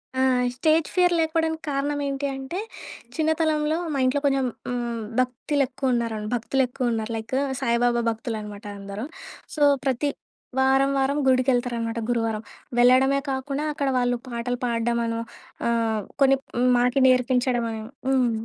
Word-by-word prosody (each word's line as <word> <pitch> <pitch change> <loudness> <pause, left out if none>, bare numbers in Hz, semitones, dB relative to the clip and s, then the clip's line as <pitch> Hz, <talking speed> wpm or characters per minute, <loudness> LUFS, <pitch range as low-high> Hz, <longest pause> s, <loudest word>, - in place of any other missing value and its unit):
ఆ! - - -1 0.4
Stage 315 +4 +2
fear 360 -1 +4
లేకపోడానికి 320 0 0
కారణమేంటి 280 0 -1
అంటే, 270 +8 -5 0.6
చిన్నతనంలో 315 -1 +1 0.2
మా 275 - -1
ఇంట్లో 260 +3 +2
కొంచం 270 -2 +2 0.2
హ్మ్, 240 -2 -2 0.2
భక్తిలెక్కువున్నారన్ 255 -4 0
భక్తులెక్కువున్నారు. 240 -2 -1
లైక్ 220 +4 -4 0.3
సాయిబాబా 240 -1 +2
భక్తులనమాట 215 -2 -5
అందరూ. 200 +3 -6 0.5
సో, 305 - -4 0.2
ప్రతి 270 +2 +1 0.5
వారం 270 +1 +4
వారం 275 +2 +1
గుడికెళ్తారనమాట 245 -3 +1
గురువారం. 225 -2 0 0.4
వెళ్ళడమే 260 +3 +5
కాకుండా, 275 +2 -2
అక్కడ 280 -1 -2
వాళ్ళు 245 -1 +1
పాటలు 240 +1 -3
పాడడమనో 235 -1 0 0.5
ఆహ్, 225 -2 +1 0.2
కొన్ని 270 0 +6 0.2
హ్మ్, 250 +1 +3
మాకి 250 +2 +2
నేర్పించడమనో. 245 -3 +1 0.3
హ్మ్. 255 -3 +3
255 Hz, 115 wpm, -24 LUFS, 235-275 Hz, 0.6 s, కొన్ని